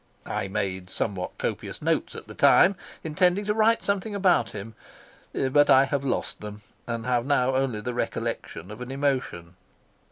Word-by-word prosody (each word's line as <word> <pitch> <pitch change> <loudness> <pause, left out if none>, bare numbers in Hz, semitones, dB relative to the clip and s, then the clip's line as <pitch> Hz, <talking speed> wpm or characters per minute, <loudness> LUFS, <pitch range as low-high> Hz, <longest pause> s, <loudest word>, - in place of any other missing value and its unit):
I 105 -2 -2
made 95 -1 -3
somewhat 95 -2 -3
copious - - -4
notes - - -1
at - - -8
the - - -10
time, 195 - +5 0.3
intending 180 +5 +2
to 210 - +1
write 225 +1 +3
something 200 +1 -1
about 190 -3 +3
him, 105 +2 -8 0.6
but 145 +2 +3
I 135 +1 +7
have 140 0 -2
lost 135 - -2
them, 105 0 -8 0.2
and 115 -1 -3
have 125 -1 +1
now 130 -1 +2
only 130 -5 0
the 125 +3 -3
recollection 95 -5 -4
of 105 +3 -9
an 125 - -6
emotion. 130 -11 -2
130 Hz, 165 wpm, -26 LUFS, 105-150 Hz, 0.6 s, I